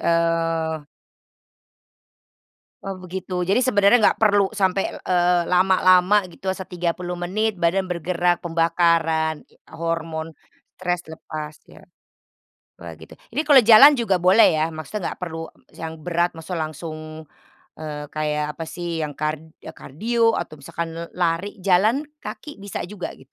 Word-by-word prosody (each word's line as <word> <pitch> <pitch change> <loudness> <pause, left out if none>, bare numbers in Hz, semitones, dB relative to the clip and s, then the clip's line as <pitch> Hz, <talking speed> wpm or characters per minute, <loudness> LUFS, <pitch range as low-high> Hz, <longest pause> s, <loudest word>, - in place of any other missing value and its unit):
eee 165 -2 0 2.0
Oh, 195 - -3
begitu. 185 0 -5
Jadi 195 +8 +2
sebenarnya 205 -2 +5
enggak - - +4
perlu 205 -2 +3
sampai, 195 -2 +1 0.2
eee, 175 -1 +2
lama-lama 185 +1 +4
gitu 190 +2 -4
se 190 0 -7
30 175 0 -3
menit 200 +5 -1
badan 180 +2 0
bergerak, 175 0 0
pembakaran, 165 -2 +1
itu - - -27 0.2
hormon 165 -1 -4 0.4
stres 180 -1 -2
lepas 155 -1 -7
ya. - - -17 1.0
Wah, - - -9
gitu, - - -13 0.2
ini - - 0
kalau 285 -3 +8
jalan 235 +7 +9
juga 225 -6 +1
boleh 185 +3 +6
ya 155 +1 +1
maksudnya, 165 +5 -5
enggak - - -29
perlu 165 -2 -5 0.2
yang 160 0 -7
berat 175 0 0
maksudnya 165 +1 -5
langsung, 155 0 -8 0.6
eee, 150 -1 -6
kayak 150 -1 -1
apa 165 - -5
sih, 170 -2 -4
yang 150 -2 -4
kar 155 0 -2 0.3
kardio 225 - 0
atau 155 -3 -6
misalkan 165 +4 -5 0.3
lari, 175 +4 -1
jalan 200 +10 +3 0.2
kaki 295 -9 -9
bisa 200 -1 -5
juga, 190 0 -6
gitu? 135 +1 -20
175 Hz, 135 wpm, -22 LUFS, 160-190 Hz, 2.0 s, jalan